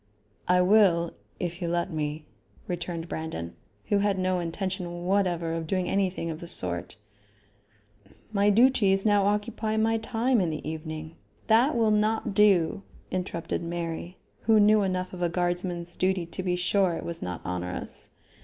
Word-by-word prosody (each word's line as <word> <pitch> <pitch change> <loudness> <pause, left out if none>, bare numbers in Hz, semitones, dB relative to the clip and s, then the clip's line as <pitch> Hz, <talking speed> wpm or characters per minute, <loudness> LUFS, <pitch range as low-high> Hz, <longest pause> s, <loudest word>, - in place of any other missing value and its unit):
"I 180 0 +4
will, 180 -4 +4 0.3
if 175 +1 -4
you 170 - -1
let 175 +2 -1
me," 150 -1 -3 0.4
returned 175 -1 -4
Brandon, 120 - -5 0.3
who 205 - +3
had 200 -1 +1
no 185 -1 +1
intention 175 0 -4
whatever 180 -4 +1
of 165 -1 -3
doing 185 +1 0
anything 185 -4 0
of 155 - -6
the 170 - -8
sort. 90 - -2 1.4
"My 200 0 +3
duties 205 -3 +4
now 205 -2 +4
occupy 215 +1 -1
my 225 +1 +2
time 235 +1 +1
in 175 - +1
the 155 -1 -5
evening 155 0 -6
" - - -36
"That 245 +6 +4
will 225 -2 +3
not 215 0 +1
do," 195 -2 +4 0.3
interrupted 180 -3 -3
Mary, 170 +1 -4 0.3
who 220 0 +5
knew 210 +1 +5
enough 185 -1 -2
of 180 - -7
a 175 - +2
guardsman's 175 0 -2
duty 185 -1 +1
to 170 +3 -4
be 180 -1 0
sure 180 0 +2
it - - -6
was 170 -1 -4
not 90 -1 -4
onerous. 90 0 -4
180 Hz, 160 wpm, -27 LUFS, 170-205 Hz, 1.4 s, who